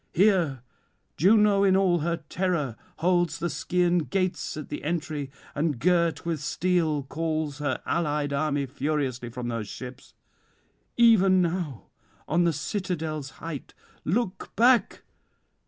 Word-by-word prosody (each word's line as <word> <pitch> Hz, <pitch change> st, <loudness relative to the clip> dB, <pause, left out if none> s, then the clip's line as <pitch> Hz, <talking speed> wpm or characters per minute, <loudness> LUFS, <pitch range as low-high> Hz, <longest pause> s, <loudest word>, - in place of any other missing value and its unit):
Here 175 Hz, -, +3 dB, 0.5 s
Juno 205 Hz, +3 st, +5 dB
in 190 Hz, -1 st, +5 dB
all 185 Hz, -3 st, +3 dB
her 165 Hz, +1 st, -2 dB
terror 170 Hz, -, -1 dB, 0.2 s
holds 175 Hz, -1 st, +2 dB
the 170 Hz, 0 st, -2 dB
Scaean 175 Hz, 0 st, +1 dB
gates 185 Hz, -5 st, -1 dB
at 155 Hz, -, -7 dB
the -, -, -5 dB
entry, 155 Hz, -3 st, -2 dB, 0.2 s
and, 150 Hz, -2 st, 0 dB
girt 170 Hz, +3 st, +2 dB
with 165 Hz, -2 st, -1 dB
steel, 160 Hz, -1 st, 0 dB
calls 155 Hz, 0 st, -3 dB
her 145 Hz, -3 st, -1 dB
allied 150 Hz, -3 st, 0 dB
army 145 Hz, -1 st, 0 dB
furiously 135 Hz, -3 st, -2 dB
from 120 Hz, 0 st, -5 dB
their 115 Hz, -2 st, -2 dB
ships.... 125 Hz, +5 st, -9 dB, 0.8 s
Even 200 Hz, -6 st, +6 dB
now 170 Hz, -, -1 dB, 0.4 s
on 170 Hz, +3 st, +2 dB
the 170 Hz, -, +3 dB
citadel's 155 Hz, -3 st, -3 dB
height, 165 Hz, -4 st, -7 dB, 0.3 s
look 190 Hz, +1 st, -1 dB
back! 245 Hz, +1 st, +3 dB
165 Hz, 125 wpm, -26 LUFS, 145-180 Hz, 0.8 s, Even